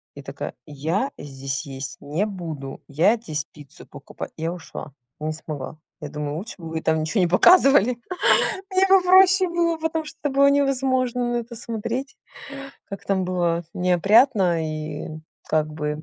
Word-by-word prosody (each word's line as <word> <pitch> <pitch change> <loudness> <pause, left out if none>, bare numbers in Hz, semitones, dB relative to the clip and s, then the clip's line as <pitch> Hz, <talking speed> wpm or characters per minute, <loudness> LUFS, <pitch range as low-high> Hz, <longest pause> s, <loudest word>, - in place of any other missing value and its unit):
и - - -9
такая: - - -6
"Я 160 - -2
здесь 135 0 -5
есть 135 -1 -7
не 155 +8 -1
буду, 160 -9 -6
я 165 +11 +3
здесь 155 -10 -4
пиццу 145 -3 -14
покупа" - - -9
Я 165 +2 -2
ушла, 160 -4 -9 0.3
не 155 +1 -2
смогла. 155 -2 -7 0.2
Я - - -5
думаю 150 0 -4
лучше 200 +6 -7
бы 165 -1 -7
вы 160 0 -3
там 160 0 +1
ничего 170 +6 0
не 180 - +3
показывали. 250 - +5 0.7
Мне 380 +1 +3
бы 385 0 +6
проще 375 0 +6
было, 340 -1 +1
потому 320 0 -2
что 310 - -11
это 290 - 0
было 280 0 +6
невозможно 260 -3 +1
на - - 0
это 235 0 -6
смотреть. 230 +3 -4 0.7
Как 200 - -8
там 190 -2 0
было 175 -2 0
неопрятно 180 - +3
и 155 0 -5 0.4
как 155 -1 +1
бы 150 0 -3
185 Hz, 160 wpm, -23 LUFS, -, 0.7 s, бы